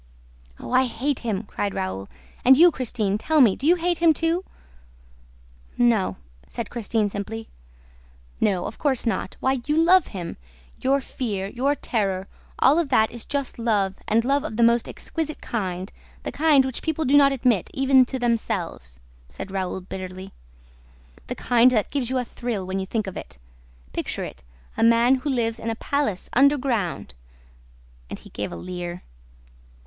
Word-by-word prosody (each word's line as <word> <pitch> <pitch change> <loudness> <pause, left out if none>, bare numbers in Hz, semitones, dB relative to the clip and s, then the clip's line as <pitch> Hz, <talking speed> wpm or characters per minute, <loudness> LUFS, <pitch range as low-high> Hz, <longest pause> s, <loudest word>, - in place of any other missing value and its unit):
"Oh, - - -8
I 255 +1 +4
hate 255 +3 -2
him!" 220 -4 -2
cried 205 -1 -3
Raoul. 95 +1 -4 0.3
"And 260 +1 +7
you, 345 +3 +7
Christine, 220 -7 -1
tell 315 +6 +2
me, 230 -8 +6
do 280 - -3
you 345 - +6
hate 350 -1 0
him 330 -2 +5
too?" 330 +4 0 1.3
"No," 230 -5 +2 0.3
said - - -6
Christine 225 -2 0
simply. 210 +3 -6 0.9
"No, 190 -4 +1
of - - -7
course 270 -5 0
not... 230 - -2
Why, 265 0 +1
you 300 +1 +1
love 350 +3 +5
him! 180 -4 -6 0.4
Your 275 +1 +2
fear, 205 -7 -4
your 270 +6 0
terror, 195 -7 -1 0.3
all 285 +6 +5
of 325 -5 -1
that 220 -4 +3
is 235 -1 -7
just 280 -4 -3
love 205 -5 +1
and 230 +2 +2
love 280 +2 +2
of 220 -9 -5
the 235 - +4
most 235 0 +3
exquisite 310 -2 -4
kind, 185 -4 -4 0.3
the - - -4
kind 295 -4 +4
which 260 -2 -4
people 320 -1 -1
do 270 +2 +3
not 280 -1 +7
admit 250 -8 +1
even 265 -1 +5
to 265 - -3
themselves," 210 - -2 0.3
said 65 - -8
Raoul 190 -1 -3
bitterly. 185 +1 -7 1.0
"The - - -4
kind 245 0 +4
that 220 -5 0
gives 265 -5 -1
you 260 - 0
a 250 - -1
thrill, 230 -6 -4
when 190 +1 -2
you 190 - -4
think 215 +1 -1
of 190 - -6
it... - - -9 0.6
Picture - - -2
it: 65 - -8 0.3
a - - 0
man 235 +3 +5
who 260 +3 -4
lives 230 -4 0
in 230 - -3
a 225 - -1
palace 255 -7 -1
underground!" 250 - +1 1.0
And - - -5
he - - -15
gave 105 - -4
a - - -6
leer. 175 -1 -6
235 Hz, 170 wpm, -24 LUFS, 195-275 Hz, 1.3 s, And